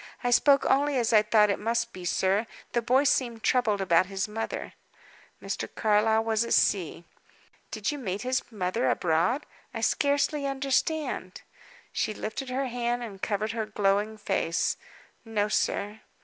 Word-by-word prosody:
I 245 - +1
spoke 280 +3 +5
only 280 +1 +2
as 235 -2 +1
I 215 - +7
thought 210 -1 +4
it - - -2
must 230 +2 -1
be, 180 -1 -8
sir. 195 +5 +1 0.2
The 235 - +1
boy 255 +4 +3
seemed 240 -5 0
troubled 220 -6 +2
about 185 -1 +3
his 195 +1 -2
mother." 225 +1 -5 0.7
Mr. - - -4
Carlyle 220 +1 +3
was 225 0 +1
at 235 - +1
sea. 175 -4 +1 0.7
"Did 215 +2 -2
you 295 - -5
meet 200 -4 -4
his 255 0 0
mother 205 +2 -1
abroad? 175 - +1 0.3
I 225 - -3
scarcely 285 +3 +1
understand." 275 +3 -1 0.5
She 215 - -1
lifted 255 +6 -5
her 265 +2 -1
hand 240 -1 -2
and 200 -5 -8
covered 215 +1 -1
her 225 -1 -3
glowing 210 +1 0
face. 170 -5 0 0.5
"No, 215 -2 -1
sir." 210 0 -1
225 Hz, 155 wpm, -27 LUFS, 205-250 Hz, 0.7 s, I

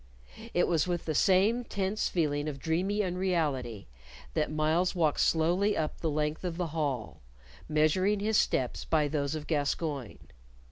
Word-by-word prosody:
It 175 - +3
was 165 -1 +1
with 175 -2 -2
the 155 - -1
same 200 +8 +3
tense 200 -1 -1
feeling 150 -3 0
of 140 - -6
dreamy 185 +8 0
unreality 160 - -1 0.5
that 150 - 0
Myles 160 +4 +1
walked 160 -4 +1
slowly 175 +6 +2
up 155 -1 -2
the 165 - 0
length 150 +2 -1
of 175 -2 -3
the 175 -2 -2
hall, 140 -8 -2 0.5
measuring 170 +7 +2
his 215 +2 0
steps 125 -2 0
by 155 -2 +2
those 145 0 -1
of 155 -1 -5
Gascoyne. 145 -4 -2
160 Hz, 150 wpm, -30 LUFS, 150-185 Hz, 0.5 s, It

